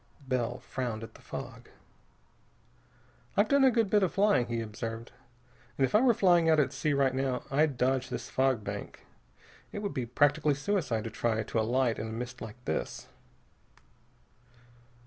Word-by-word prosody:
Bell 125 Hz, -2 st, -1 dB
frowned 120 Hz, -5 st, -4 dB
at 115 Hz, -, -9 dB
the -, -, -16 dB
fog. -, -, -8 dB, 1.7 s
"I've 205 Hz, +2 st, +4 dB
done 280 Hz, +3 st, +4 dB
a 265 Hz, -, +7 dB
good 230 Hz, -3 st, +2 dB
bit 205 Hz, +1 st, +3 dB
of 190 Hz, -, +2 dB
flying," 200 Hz, -, +3 dB
he 115 Hz, -1 st, -2 dB
observed, 115 Hz, +1 st, -5 dB, 0.7 s
"and 135 Hz, -, +4 dB
if -, -, -5 dB
I 210 Hz, -, +6 dB
were 250 Hz, -3 st, +4 dB
flying 175 Hz, -4 st, +4 dB
out 160 Hz, -1 st, +5 dB
at 140 Hz, -2 st, +1 dB
sea 150 Hz, +3 st, 0 dB
right 135 Hz, -2 st, +2 dB
now, 130 Hz, -1 st, -1 dB
I'd 145 Hz, -1 st, +2 dB
dodge 130 Hz, 0 st, +1 dB
this -, -, -5 dB
fog 130 Hz, -4 st, +1 dB
bank. 100 Hz, 0 st, -7 dB, 0.7 s
It 205 Hz, -, -5 dB
would 200 Hz, -, -2 dB
be 130 Hz, -4 st, -3 dB
practically 145 Hz, +4 st, +2 dB
suicide 145 Hz, -, -1 dB
to 115 Hz, -, -5 dB
try 110 Hz, -1 st, 0 dB
to 115 Hz, -, -2 dB
alight 120 Hz, +2 st, +1 dB
in 110 Hz, -, -3 dB
a -, -, -6 dB
mist 125 Hz, +2 st, -6 dB
like 110 Hz, +1 st, -8 dB
this." -, -, -3 dB
130 Hz, 170 wpm, -30 LUFS, 115-160 Hz, 1.7 s, a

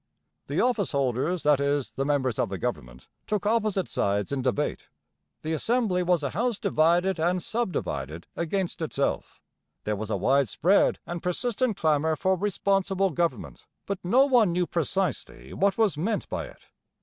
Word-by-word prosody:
The -, -, -1 dB
office 235 Hz, -10 st, +1 dB
holders, 140 Hz, +5 st, 0 dB
that 150 Hz, -2 st, +4 dB
is, 140 Hz, -1 st, 0 dB
the 135 Hz, -, -3 dB
members 130 Hz, -5 st, 0 dB
of 115 Hz, -, +1 dB
the 95 Hz, -, -4 dB
government, -, -, -5 dB, 0.2 s
took 210 Hz, -1 st, -1 dB
opposite 210 Hz, -4 st, +1 dB
sides 100 Hz, +2 st, -1 dB
in 140 Hz, -2 st, -1 dB
debate. 135 Hz, +3 st, -1 dB, 0.6 s
The 160 Hz, -, -2 dB
Assembly 215 Hz, +1 st, +1 dB
was 175 Hz, -3 st, +1 dB
a 140 Hz, -, -1 dB
house 230 Hz, +4 st, 0 dB
divided 175 Hz, 0 st, +2 dB
and 175 Hz, +3 st, +1 dB
sub 225 Hz, +2 st, -2 dB
divided 75 Hz, -, -4 dB
against 175 Hz, +1 st, -2 dB
itself. 140 Hz, -3 st, -2 dB, 0.4 s
There 105 Hz, -, -1 dB
was 110 Hz, +1 st, -5 dB
a -, -, 0 dB
wide 135 Hz, -2 st, +2 dB
spread 190 Hz, -, +3 dB
and 175 Hz, -1 st, -5 dB
persistent 230 Hz, +5 st, 0 dB
clamour 155 Hz, 0 st, +2 dB
for 190 Hz, +4 st, +1 dB
'responsible 195 Hz, 0 st, 0 dB
government,' 170 Hz, +2 st, -3 dB, 0.2 s
but 200 Hz, -2 st, -3 dB
no 245 Hz, +10 st, +4 dB
one 240 Hz, -9 st, +4 dB
knew 175 Hz, +1 st, +1 dB
precisely 165 Hz, -, -2 dB
what 195 Hz, +1 st, +1 dB
was 210 Hz, -9 st, +2 dB
meant 210 Hz, +6 st, -1 dB
by -, -, -3 dB
it. -, -, -17 dB
175 Hz, 165 wpm, -26 LUFS, 140-200 Hz, 0.6 s, that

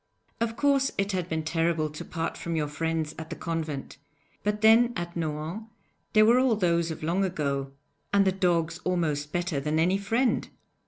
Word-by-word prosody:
Of 230 Hz, 0 st, -1 dB
course 275 Hz, -1 st, +3 dB
it 200 Hz, +1 st, 0 dB
had 180 Hz, -2 st, -2 dB
been 160 Hz, -1 st, -1 dB
terrible 165 Hz, -1 st, +1 dB
to 150 Hz, -, -7 dB
part 165 Hz, -1 st, -3 dB
from 170 Hz, -1 st, -4 dB
your 150 Hz, -2 st, 0 dB
friends 160 Hz, +1 st, -2 dB
at 160 Hz, 0 st, -7 dB
the -, -, -5 dB
convent, 155 Hz, -5 st, -4 dB, 0.4 s
but 210 Hz, 0 st, -1 dB
then 230 Hz, +2 st, +6 dB
at 175 Hz, -1 st, -4 dB
Nohant 160 Hz, +5 st, -3 dB, 0.5 s
there 215 Hz, 0 st, +6 dB
were 235 Hz, +3 st, +6 dB
all 255 Hz, -3 st, +3 dB
those 170 Hz, -4 st, +1 dB
of 160 Hz, -, -6 dB
long 175 Hz, +5 st, +1 dB
ago 140 Hz, -7 st, -2 dB, 0.4 s
and 200 Hz, -1 st, +4 dB
the 190 Hz, -, +4 dB
dogs 175 Hz, -3 st, 0 dB
almost 155 Hz, -5 st, -1 dB
better 175 Hz, -3 st, -1 dB
than 150 Hz, +3 st, -1 dB
any 180 Hz, +4 st, +2 dB
friend! 230 Hz, +6 st, +1 dB
170 Hz, 180 wpm, -27 LUFS, 160-200 Hz, 0.5 s, then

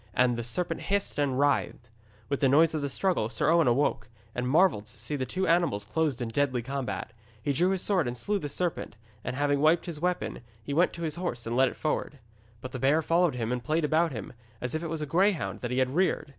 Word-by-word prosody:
And 125 Hz, -1 st, +3 dB
the 120 Hz, -, -3 dB
serpent 120 Hz, +10 st, -2 dB
hissed 200 Hz, -5 st, -1 dB
and 135 Hz, -3 st, +1 dB
writhed. 140 Hz, -4 st, 0 dB, 0.4 s
With 140 Hz, 0 st, -1 dB
the 135 Hz, -, +3 dB
noise 160 Hz, +4 st, +5 dB
of 155 Hz, -, -1 dB
the 140 Hz, -, -2 dB
struggle 175 Hz, -, 0 dB
Sir 115 Hz, +6 st, +1 dB
Owen 165 Hz, -3 st, +4 dB
awoke, 120 Hz, -2 st, +1 dB, 0.2 s
and 125 Hz, 0 st, -2 dB
marvelled 150 Hz, -, +3 dB
to -, -, -15 dB
see 150 Hz, -, -4 dB
the 130 Hz, -2 st, -2 dB
two 190 Hz, +1 st, -1 dB
animals 165 Hz, -12 st, +2 dB
closed 140 Hz, +1 st, -1 dB
in 115 Hz, -, -4 dB
deadly 130 Hz, 0 st, 0 dB
combat. 135 Hz, +1 st, -4 dB, 0.3 s
He 140 Hz, +6 st, -1 dB
drew 175 Hz, +6 st, +2 dB
his 190 Hz, -2 st, 0 dB
sword 185 Hz, -9 st, +2 dB
and 120 Hz, +1 st, -3 dB
slew 205 Hz, +9 st, -1 dB
the 145 Hz, -, -5 dB
serpent, 170 Hz, -6 st, -3 dB, 0.3 s
and -, -, -3 dB
having 145 Hz, 0 st, +1 dB
wiped 155 Hz, +3 st, +3 dB
his 170 Hz, -4 st, -5 dB
weapon, 180 Hz, 0 st, -1 dB, 0.2 s
he 140 Hz, -, -4 dB
went 170 Hz, +5 st, +3 dB
to 170 Hz, -, -6 dB
his 160 Hz, 0 st, -2 dB
horse 120 Hz, -10 st, -3 dB
and 115 Hz, +1 st, -2 dB
led 130 Hz, 0 st, +4 dB
it -, -, -10 dB
forward. 150 Hz, -1 st, -2 dB, 0.4 s
But 130 Hz, -, -7 dB
the 130 Hz, -, -5 dB
bear 145 Hz, +5 st, +3 dB
followed 170 Hz, -3 st, +2 dB
him 115 Hz, -1 st, -2 dB
and 125 Hz, -1 st, -2 dB
played 155 Hz, +1 st, +1 dB
about 160 Hz, +2 st, +2 dB
him, 110 Hz, -6 st, -7 dB, 0.3 s
as 125 Hz, 0 st, -3 dB
if 160 Hz, -, -1 dB
it 170 Hz, -, -3 dB
was 160 Hz, -1 st, -3 dB
a -, -, -2 dB
greyhound 170 Hz, -, +1 dB
that 120 Hz, -, -3 dB
he 125 Hz, -, -2 dB
had 130 Hz, 0 st, +1 dB
reared. 180 Hz, -2 st, +1 dB
145 Hz, 245 wpm, -28 LUFS, 125-170 Hz, 0.4 s, noise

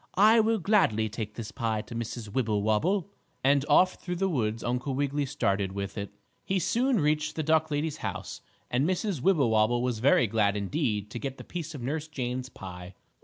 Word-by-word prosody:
I 215 Hz, +4 st, +7 dB
will 225 Hz, +1 st, +3 dB
gladly 165 Hz, -, +2 dB
take 105 Hz, -1 st, -5 dB
this 115 Hz, -2 st, -6 dB
pie 110 Hz, -2 st, -2 dB
to -, -, -10 dB
Mrs. 115 Hz, -1 st, -5 dB
Wibblewobble," 110 Hz, -, +1 dB, 0.3 s
and 140 Hz, +1 st, +4 dB
off 185 Hz, +5 st, +4 dB
through 180 Hz, -1 st, -3 dB
the 195 Hz, +2 st, 0 dB
woods 115 Hz, -8 st, -1 dB
Uncle 125 Hz, +3 st, -1 dB
Wiggily 145 Hz, +1 st, 0 dB
started 100 Hz, -8 st, 0 dB
with 100 Hz, 0 st, -4 dB
it. 100 Hz, -1 st, -5 dB, 0.3 s
He 190 Hz, -, 0 dB
soon 240 Hz, +5 st, +2 dB
reached 150 Hz, 0 st, +1 dB
the 160 Hz, -, -1 dB
duck 160 Hz, +1 st, +2 dB
lady's 150 Hz, +1 st, -1 dB
house, -, -, -5 dB, 0.3 s
and 135 Hz, +7 st, +2 dB
Mrs. 185 Hz, -, -1 dB
Wibblewobble 120 Hz, -, +3 dB
was 125 Hz, -3 st, -1 dB
very 125 Hz, 0 st, +4 dB
glad 105 Hz, -2 st, +1 dB
indeed 105 Hz, -, -1 dB
to 120 Hz, -, -5 dB
get 135 Hz, +1 st, -5 dB
the -, -, -9 dB
piece 165 Hz, -3 st, -6 dB
of 130 Hz, -, -7 dB
Nurse 150 Hz, +4 st, -2 dB
Jane's 130 Hz, -4 st, -4 dB
pie. 90 Hz, -3 st, -9 dB
130 Hz, 185 wpm, -28 LUFS, 110-160 Hz, 0.3 s, I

